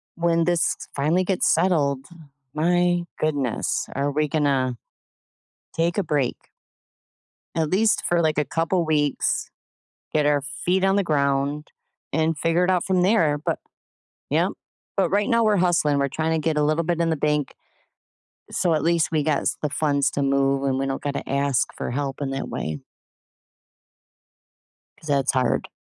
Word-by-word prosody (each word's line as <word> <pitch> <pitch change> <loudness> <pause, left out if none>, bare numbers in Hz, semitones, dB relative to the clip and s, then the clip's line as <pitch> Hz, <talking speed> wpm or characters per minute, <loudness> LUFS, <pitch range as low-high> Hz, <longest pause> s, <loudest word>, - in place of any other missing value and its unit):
when 170 -1 +2
this 175 -1 +1 0.2
finally 155 +6 +2
gets 185 0 +1
settled, 145 -6 +1 0.5
my 175 +2 +2 0.2
goodness, 145 -6 -1
are 140 +1 0
we 150 +1 0
gonna 140 -4 +1 1.0
take 170 +3 0
a 200 - +2
break 145 -6 0 1.2
at 160 -2 0
least 215 +4 +2
for 175 -1 +2
like 155 -2 +1
a 150 - +2
couple 165 +4 0
weeks, 150 -2 0 0.6
get 150 -1 +2
our 145 -1 +3
feet 175 +7 -1
on 195 0 +3
the 200 - +2
ground, 140 -1 0 0.4
and 160 +1 +1
figure 165 +4 +1
it 185 - +2
out 180 -2 +1
from 185 -2 +2
there. 170 -7 +3
But 150 - -2 0.7
yep, - - +2 0.4
but 195 - +2
right 205 +3 +1
now 230 -2 +3
we're 210 -1 +3
hustling. 170 -5 +2
We're 140 0 +1
trying 160 +3 -1
to 160 -1 -1
get 160 -2 +1
a 150 - +2
little 155 +2 +1
bit 170 0 -1
in 165 -1 +2
the 160 - 0
bank 150 -1 0 1.0
so 175 -3 +1
at 150 - 0
least 170 -1 +2
we 155 -2 +1
gots 150 -2 0
the 150 - -1
funds 145 -2 +1
to 140 - -2
move 135 0 +1
and 135 -1 0
we 135 - -1
don't 135 0 -3
gotta 145 -1 -4
ask 140 -2 +1
for - - -3
help 135 +1 -3
in 140 - -2
that 135 - -4
way 80 -1 -4 2.2
‘cause 155 - -13
that's 140 -1 +2
hard. 130 -1 0
155 Hz, 165 wpm, -23 LUFS, 140-170 Hz, 2.2 s, our